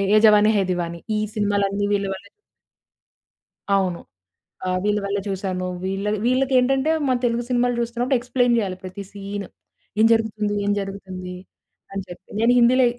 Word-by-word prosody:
'ఏ -, -, +7 dB
జవాని 210 Hz, 0 st, +6 dB
హే 200 Hz, -, +3 dB
దివాని' 170 Hz, -1 st, -3 dB, 0.2 s
ఈ -, -, +1 dB
సినిమా‌లన్నీ 205 Hz, -1 st, +1 dB
వీళ్ళ 200 Hz, -1 st, +1 dB
వల్లె 195 Hz, +1 st, -10 dB, 1.5 s
అవును. 185 Hz, -3 st, 0 dB, 0.7 s
ఆహ్, 185 Hz, 0 st, +1 dB
వీళ్ళ 210 Hz, 0 st, +2 dB
వల్లె 200 Hz, 0 st, -1 dB
చూసాను. 185 Hz, -2 st, -2 dB, 0.2 s
వీళ్ళ 195 Hz, +1 st, -2 dB, 0.2 s
వీళ్ళకేంటంటే 265 Hz, +2 st, +3 dB, 0.2 s
మన 255 Hz, -1 st, +2 dB
తెలుగు 235 Hz, 0 st, +1 dB
సినిమాలు 245 Hz, 0 st, +2 dB
చూస్తున్నప్పుడు 240 Hz, +3 st, 0 dB
ఎక్స్‌ప్లైన్ 245 Hz, 0 st, +2 dB
జేయాలి. 195 Hz, -5 st, -1 dB
ప్రతి 185 Hz, +2 st, -7 dB
సీన్ 200 Hz, 0 st, -5 dB, 0.5 s
ఏం 220 Hz, -, +6 dB
జరుగుతుంది? 215 Hz, -2 st, 0 dB
ఏం 205 Hz, -, +2 dB
జరుగుతుంది? 190 Hz, -2 st, -6 dB, 0.6 s
అని 195 Hz, -, -2 dB
చెప్పి 180 Hz, +1 st, -12 dB
నేను 230 Hz, +2 st, +4 dB
హిందీలో 250 Hz, +2 st, +5 dB
205 Hz, 145 wpm, -23 LUFS, 195-240 Hz, 1.5 s, ఏ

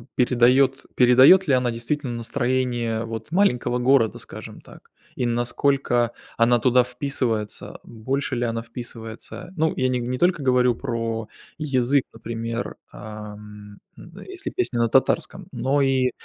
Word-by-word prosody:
передает 125 Hz, +2 st, +3 dB
передает 130 Hz, +9 st, +7 dB
ли 140 Hz, -, +3 dB
она 125 Hz, -2 st, +2 dB
действительно 120 Hz, +3 st, -3 dB
настроение 120 Hz, -2 st, -1 dB
вот 115 Hz, +4 st, -7 dB
маленького 125 Hz, -10 st, +2 dB
города, 125 Hz, -3 st, +3 dB
скажем -, -, -10 dB
так? -, -, -17 dB, 0.2 s
И 125 Hz, -, -1 dB
насколько 120 Hz, 0 st, +1 dB, 0.3 s
она 120 Hz, +1 st, +4 dB
туда 125 Hz, 0 st, +4 dB
вписывается 125 Hz, -4 st, -3 dB
больше, 130 Hz, +4 st, -3 dB
ли 120 Hz, -, -1 dB
она 115 Hz, 0 st, -2 dB
вписывается, 115 Hz, +7 st, -8 dB
ну, 160 Hz, 0 st, +1 dB
я 130 Hz, -, +2 dB
не 125 Hz, -1 st, 0 dB
не 125 Hz, +1 st, -3 dB
только 175 Hz, -3 st, +1 dB
говорю 125 Hz, -2 st, +3 dB
про 115 Hz, -3 st, -3 dB, 0.3 s
язык, 135 Hz, -2 st, +2 dB
например, 115 Hz, +1 st, -5 dB, 0.2 s
а, 105 Hz, -1 st, -8 dB
м 105 Hz, -1 st, -13 dB, 0.5 s
если 380 Hz, 0 st, -5 dB
песня 370 Hz, -, -1 dB
на 115 Hz, -, +2 dB
татарском -, -, +1 dB
но 140 Hz, +2 st, +1 dB
и, 130 Hz, -2 st, +2 dB
125 Hz, 135 wpm, -23 LUFS, 115-135 Hz, 0.5 s, передает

